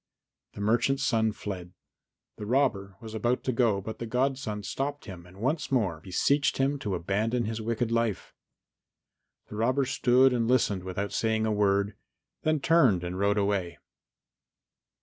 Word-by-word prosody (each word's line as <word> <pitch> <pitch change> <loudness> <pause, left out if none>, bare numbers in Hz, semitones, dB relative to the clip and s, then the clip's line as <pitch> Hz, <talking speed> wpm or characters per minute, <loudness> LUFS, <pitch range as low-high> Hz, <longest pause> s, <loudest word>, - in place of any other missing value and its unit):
The - - -8
merchant's 120 +6 +1
son 110 -4 +2
fled. 95 -4 -7 0.6
The 105 - -6
robber 110 -7 +1
was 110 -1 -9
about 120 +3 0
to 130 - 0
go, 115 -5 +2
but 110 +3 -7
the 115 - -4
godson 125 -4 -1
stopped 140 +8 -4
him 90 -5 -10
and 90 +2 -16
once 135 +10 -1
more 100 -11 +1
beseeched 140 - +1
him 135 +1 +1
to 105 -7 -2
abandon 110 +7 -1
his 110 +1 -3
wicked 115 +1 -1
life. 115 -4 -1 1.2
The 105 - -7
robber 130 +5 +1
stood 125 +1 +3
and 115 -2 0
listened 110 -7 +2
without 95 +2 -4
saying 110 -1 +1
a 110 - 0
word, 100 0 +1 0.5
then 155 -2 +1
turned 135 - +4
and 90 +1 -4
rode 100 +1 +2
away. 100 -4 0
110 Hz, 155 wpm, -28 LUFS, 100-125 Hz, 1.2 s, turned